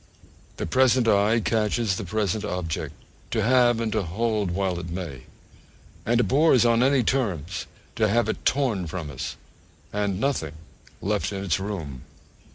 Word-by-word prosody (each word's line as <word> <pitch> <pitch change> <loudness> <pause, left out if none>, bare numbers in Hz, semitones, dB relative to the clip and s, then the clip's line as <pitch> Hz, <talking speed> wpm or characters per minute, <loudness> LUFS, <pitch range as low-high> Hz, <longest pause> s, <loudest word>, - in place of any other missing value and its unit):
The - - -3
present 125 +6 +3
eye 105 +2 +4
catches 110 -1 +1
the 105 - -4
present 105 +2 -1
object 90 -6 -3 0.3
to - - 0
have 120 -1 +4
and 115 -1 -1
to 110 - +1
hold 105 +3 -1
while 90 0 -1
it 85 - -7
may; 85 -7 -6 0.8
and 120 +1 +3
abhors, 130 0 +4
on 115 0 +4
any 135 0 +4
terms, 95 - -1 0.3
to 110 - +3
have 115 +3 +2
it - - -3
torn 120 -10 +1
from 80 -3 -5
us, 65 -2 -5 0.6
and 100 -2 -1
nothing 110 - -1 0.5
left 105 +1 0
in 100 -1 -4
its 90 -3 0
room. 85 -10 -5
105 Hz, 155 wpm, -25 LUFS, 90-115 Hz, 0.8 s, eye